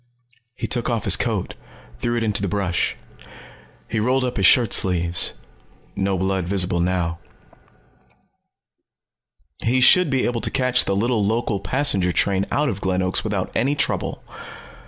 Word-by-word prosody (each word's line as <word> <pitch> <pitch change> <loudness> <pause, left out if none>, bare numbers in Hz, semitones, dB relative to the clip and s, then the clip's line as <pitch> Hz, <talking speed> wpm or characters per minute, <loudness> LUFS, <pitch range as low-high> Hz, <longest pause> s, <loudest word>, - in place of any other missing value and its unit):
He - - -4
took 120 -2 -1
off 115 -3 -1
his - - +4
coat, - - -2 0.5
threw 120 - -1
it 115 - -1
into 105 -3 0
the 100 - -1
brush. 95 -2 -1 0.9
He 110 - -2
rolled 130 +4 +1
up 125 -1 -3
his 95 -2 +4
shirt 120 -5 +4
sleeves. 85 -2 +1 0.6
No 95 -1 -1
blood 95 -1 -1
visible 90 -2 +1
now. 85 -1 -1 2.4
He 125 +3 +2
should 180 +6 +5
be 135 -2 0
able 120 -1 -2
to - - 0
catch 125 -1 +2
the 100 - -1
little 115 +1 0
local 110 0 -1
passenger 100 -6 +1
train 95 +2 0
out 150 +1 +1
of 100 -6 -3
Glen 95 0 0
Oaks 90 0 0
without 100 -4 -3
any 140 +5 0
trouble. 145 - -1
100 Hz, 155 wpm, -21 LUFS, 95-125 Hz, 2.4 s, should